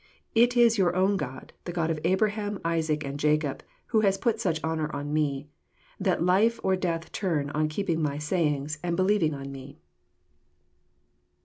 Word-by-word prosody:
It 240 +2 +4
is 230 -2 +5
your 180 -2 +2
own 190 +2 +3
God, 130 -7 -6
the 175 - -4
God 165 -2 0
of 155 - -2
Abraham, 205 +3 0
Isaac, 160 -3 0
and 140 +1 -5
Jacob, 150 -1 +1 0.3
who 220 - +3
has 195 -2 +2
put 225 +2 0
such 170 -7 0
honour 160 -1 -1
on 145 +1 -4
Me, 145 -2 0 0.5
that 185 -3 +1
life 210 +6 +3
or 190 0 +3
death 170 -3 -3
turn 155 -7 -1
on 155 +1 0
keeping 165 -1 -1
My 145 -2 -1
sayings, 150 -2 -1
and 170 -1 -1
believing 185 -4 +2
on 140 0 -7
Me." 135 0 -10
165 Hz, 170 wpm, -27 LUFS, 150-195 Hz, 0.5 s, is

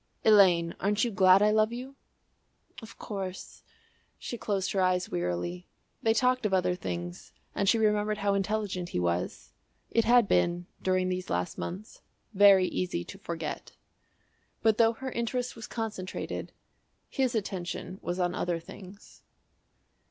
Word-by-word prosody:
"Elaine, 185 -6 +5
aren't 205 +2 +1
you 240 - 0
glad 190 -1 +6
I 210 - +4
love 215 +1 +3
you?" 255 +3 -7 0.9
"Of 225 - -12
course." 190 -3 -6 0.6
She - - -6
closed 200 -5 -2
her 195 - +1
eyes 185 0 +1
wearily. 90 - -3 0.3
They 225 0 +2
talked 255 +2 +2
of 205 -3 +2
other 180 -1 +2
things 90 - -6 0.2
and 200 - +1
she 230 - +4
remembered 210 -1 +1
how 200 -1 +1
intelligent 200 -3 -2
he - - -2
was. 90 0 -2 0.4
It 230 - +2
had 240 -2 +5
been 175 -1 +1 0.2
during 185 0 +1
these 185 0 -3
last 90 0 -2
months 185 - -7 0.3
very 195 -2 +7
easy 180 - -2
to - - -11
forget. - - -5 0.9
But 220 -1 +3
though 230 0 +5
her 260 +3 -6
interest 245 +2 -2
was 225 -1 -8
concentrated, 215 -5 -5 0.6
his 260 -3 -1
attention 190 -2 -4
was 175 - -3
on 175 -1 +1
other 175 -2 -1
things. 195 +4 -13
195 Hz, 145 wpm, -29 LUFS, 180-220 Hz, 0.9 s, very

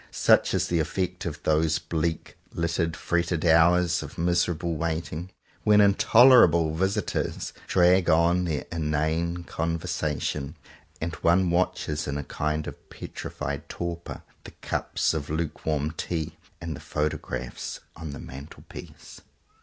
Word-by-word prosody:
Such - - +3
is - - +1
the 85 - +1
effect 90 +3 -2
of 80 - -6
those 80 0 +2
bleak, 80 0 -3 0.2
littered, 85 -1 -1
fretted 85 -1 -1
hours 85 +1 +4
of 75 -2 -9
miserable 85 0 0
waiting, 80 +2 -3 0.3
when 105 -1 +5
intolerable 100 - +6
visitors 95 +5 -1
drag 90 0 +4
on 85 +3 +3
their 80 -4 -2
inane 80 +2 -1
"con 85 0 -2
versation," 75 -2 -3 0.4
and 85 +1 -3
one 85 +1 +3
watches 85 -4 0
in 70 0 -2
a 75 - -3
kind 75 +2 -2
of - - -10
petrified 70 +1 -6
torpor 85 0 -5 0.2
the - - -10
cups - - 0
of 75 -3 -4
lukewarm 75 -1 -2
tea 80 0 -4 0.2
and 85 -2 -5
the - - -9
photographs 75 +1 -4 0.2
on 80 -1 -7
the 70 - -7
mantelpiece. 70 +4 -11
85 Hz, 130 wpm, -26 LUFS, 75-85 Hz, 0.4 s, intolerable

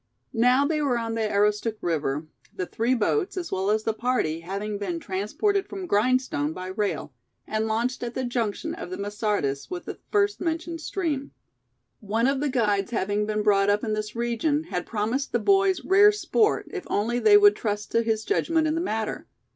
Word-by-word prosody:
Now 250 +4 +4
they 305 0 0
were 265 -4 +1
on 230 -1 -3
the 225 -1 -1
Aroostook 210 +2 +1
River, 155 -3 -1 0.3
the 185 - -2
three 235 +7 0
boats, 370 - 0
as 350 -2 -4
well 190 +1 0
as 215 +1 +2
the 225 - 0
party, 220 -9 0
having 200 +4 -4
been 180 -4 -3
transported 210 - -1
from 390 -2 -5
Grindstone 220 - +1
by 185 +1 -6
rail, 200 +2 -2 0.3
and 220 0 -1
launched 235 +4 -1
at 240 -1 -4
the 260 - -1
junction 240 +5 -2
of 255 - -7
the 185 - -5
Masardis 200 -9 -2
with 360 -1 -5
the - - -7
first 410 0 +2
mentioned 330 0 -3
stream. 305 -6 -3 0.7
One 220 +3 0
of 270 +1 +2
the 290 0 0
guides 210 -6 +1
having 210 -2 -1
been 215 0 -1
brought 200 -1 +3
up 205 +1 +2
in 215 - -1
this 215 +1 -4
region, 240 +6 0
had 335 - -4
promised 230 +6 -2
the - - +4
boys 390 - +3
rare 405 +2 +7
sport, 425 +1 +1
if 390 -3 -5
only 235 +4 0
they 415 - +7
would 410 0 +6
trust 210 -1 -3
to 230 - +3
his 220 -1 -1
judgment 330 -5 +1
in 310 - +1
the 330 - -1
matter. 220 -10 -3
230 Hz, 195 wpm, -25 LUFS, 205-310 Hz, 0.7 s, rare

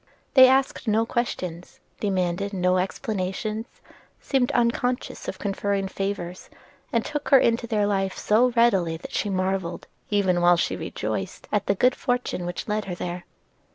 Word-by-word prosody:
They 260 -1 +9
asked 265 -1 +1
no 220 +1 +3
questions, 180 -8 -4 0.2
demanded 190 0 -1
no 180 -1 +2
explanations, 210 +2 -3 0.5
seemed 260 -3 +1
unconscious 245 +1 0
of 190 - -4
conferring 200 0 -1
favors, 190 -2 -4 0.4
and 230 -1 +1
took 295 -1 -4
her 275 - +8
into 235 -1 +2
their 215 -3 +1
life 195 -2 0
so 230 +4 +3
readily 190 -9 +3
that - - -10
she 210 - 0
marvelled, 185 -2 -2 0.2
even 190 -4 +2
while 175 0 +5
she - - 0
rejoiced, - - -4
at 205 -1 0
the 200 - +2
good 250 +6 +4
fortune 245 -8 -2
which 175 - -5
led 215 0 -1
her 180 - -4
there. 175 0 -5
200 Hz, 155 wpm, -25 LUFS, 185-235 Hz, 0.5 s, They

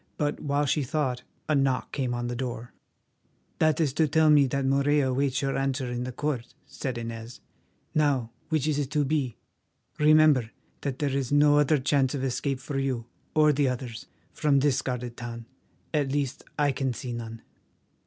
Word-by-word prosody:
But 145 -1 -1
while 145 0 0
she 150 +2 +1
thought, 130 -2 -1 0.3
a 155 - +2
knock 135 -3 +1
came 130 -4 -1
on 120 0 -3
the 120 0 -3
door. 120 -1 -5 0.9
"That 155 0 +3
is 150 -5 +1
to 160 +1 +2
tell 155 +1 +4
me 145 -2 +6
that 140 +1 -1
Morella 140 0 +2
awaits 135 +1 0
your 135 0 0
answer 135 -1 -1
in 125 0 -3
the 130 - -4
court," 130 -3 -3
said 130 -2 -5
Inez. 115 0 -6 0.5
"Now, 140 -6 +1 0.2
which 155 -2 +1
is 150 -2 +1
it 140 -2 -2
to 150 0 +1
be? 135 -5 -1 0.6
Remember 150 -5 +5 0.3
that 135 -2 -3
there 140 -2 -1
is 135 -2 -1
no 145 0 +5
other 150 +1 +4
chance 135 0 +1
of 135 - -3
escape 135 +1 -1
for 135 +1 -3
you, 130 -4 -1 0.3
or 150 -1 +5
the 140 -1 +2
others, 125 -2 -5 0.3
from 145 -2 +2
this 140 -2 +2
guarded 125 -2 -4
town—at 120 +4 -5
least 140 -1 -2
I 145 -1 +3
can 130 -1 -1
see 125 -1 -5
none." 115 -1 -7
135 Hz, 180 wpm, -27 LUFS, 125-145 Hz, 0.9 s, me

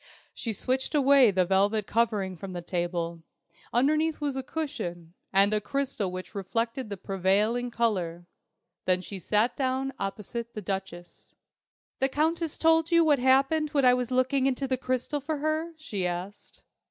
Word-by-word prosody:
She 230 - -4
switched 255 +7 -1
away 275 -3 +6
the 185 -2 +2
velvet 200 +3 +2
covering 210 -5 0
from 185 +2 -8
the 175 -1 -5
table. 170 -1 -2 0.5
Underneath 305 +6 +2
was 290 -2 -2
a 265 - -1
cushion, 215 - -5 0.2
and 200 +2 +4
a 210 - +1
crystal 270 -7 -2
which 185 0 -7
reflected 230 +5 -2
the 200 - -5
prevailing 200 +6 +1
colour. 185 -8 -1 0.6
Then 180 0 +2
she 195 +1 -7
sat 210 +7 +1
down 265 0 -1
opposite 230 +4 -5
the - - -3
Duchess. 185 -2 -6 0.6
"The 270 - +2
Countess 320 +3 0
told 325 0 +3
you 335 -1 +5
what 295 -3 +4
happened 275 +4 +3
when 280 -2 +4
I 250 - +7
was 250 -1 -1
looking 260 +1 +2
into 270 +1 -1
the 260 - +1
crystal 255 +3 -2
for 305 +2 -2
her?" 310 +3 -1
she 205 - -3
asked. 180 +4 -7
235 Hz, 160 wpm, -28 LUFS, 195-275 Hz, 0.6 s, I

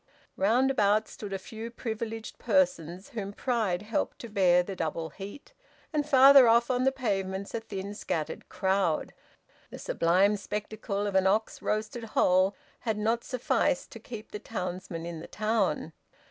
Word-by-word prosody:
Round 240 +7 +3
about 215 -3 +2
stood 205 -2 -8
a 195 - -1
few 220 +4 -8
privileged 225 -1 -5
persons, 185 - +1
whom 210 -7 -5
pride 210 -7 -1
helped 220 +2 -2
to 235 - -8
bear 180 -3 +4
the 195 +2 -6
double 160 -1 -3
heat; 205 +8 -10 0.4
and 300 -1 0
farther 270 -1 +8
off 235 +2 +4
on 255 0 +1
the 265 - +4
pavements, 195 -6 -2
a 230 - -1
thin 200 -2 -6
scattered 160 -6 -4
crowd. 190 -4 0 0.6
The - - -9
sublime 190 +5 +2
spectacle 210 0 -4
of 205 - -2
an 190 0 +4
ox 215 +3 0
roasted 215 +2 -2
whole 185 +2 +4 0.2
had 220 -3 -2
not 225 +2 0
sufficed 265 +2 0
to 230 - -9
keep 220 -1 -9
the 210 - -5
townsmen 185 -5 -5
in 170 -1 -5
the - - -9
town. 210 -8 0
210 Hz, 160 wpm, -29 LUFS, 190-230 Hz, 0.6 s, farther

